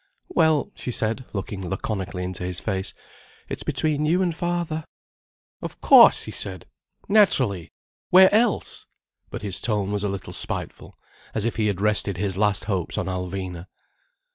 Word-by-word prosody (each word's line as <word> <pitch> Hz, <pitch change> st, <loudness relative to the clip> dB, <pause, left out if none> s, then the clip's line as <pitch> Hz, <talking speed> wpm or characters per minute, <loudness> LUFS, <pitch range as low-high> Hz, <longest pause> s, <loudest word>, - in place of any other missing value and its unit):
"Well," 160 Hz, -, +2 dB
she -, -, -7 dB
said, 115 Hz, +1 st, -2 dB
looking 95 Hz, -2 st, -5 dB
laconically 95 Hz, -2 st, -3 dB
into 90 Hz, 0 st, -4 dB
his 90 Hz, -1 st, -1 dB
face: 95 Hz, -2 st, -3 dB, 0.5 s
"It's -, -, -5 dB
between 150 Hz, -1 st, 0 dB
you 175 Hz, +5 st, +2 dB
and 175 Hz, -2 st, 0 dB
father—" 175 Hz, -2 st, -2 dB, 0.8 s
"Of -, -, -7 dB
cauce!" -, -, +7 dB
he -, -, -7 dB
said. 95 Hz, -3 st, -6 dB, 0.4 s
"Naturally! 130 Hz, -, +2 dB, 0.4 s
Where 190 Hz, +2 st, +7 dB
else—!" 220 Hz, -1 st, +1 dB, 0.4 s
But -, -, -7 dB
his 95 Hz, -4 st, 0 dB
tone 105 Hz, -3 st, 0 dB
was 105 Hz, -1 st, -1 dB
a 105 Hz, -, 0 dB
little 95 Hz, -1 st, -6 dB
spiteful, -, -, -2 dB, 0.4 s
as 110 Hz, -, 0 dB
if 115 Hz, -, -2 dB
he 110 Hz, -1 st, +1 dB
had 100 Hz, -2 st, -2 dB
rested 105 Hz, -3 st, +2 dB
his 95 Hz, 0 st, -2 dB
last 105 Hz, 0 st, +2 dB
hopes 95 Hz, -5 st, -2 dB
on -, -, -1 dB
Alvina. 90 Hz, -1 st, -5 dB
105 Hz, 155 wpm, -24 LUFS, 95-150 Hz, 0.8 s, cauce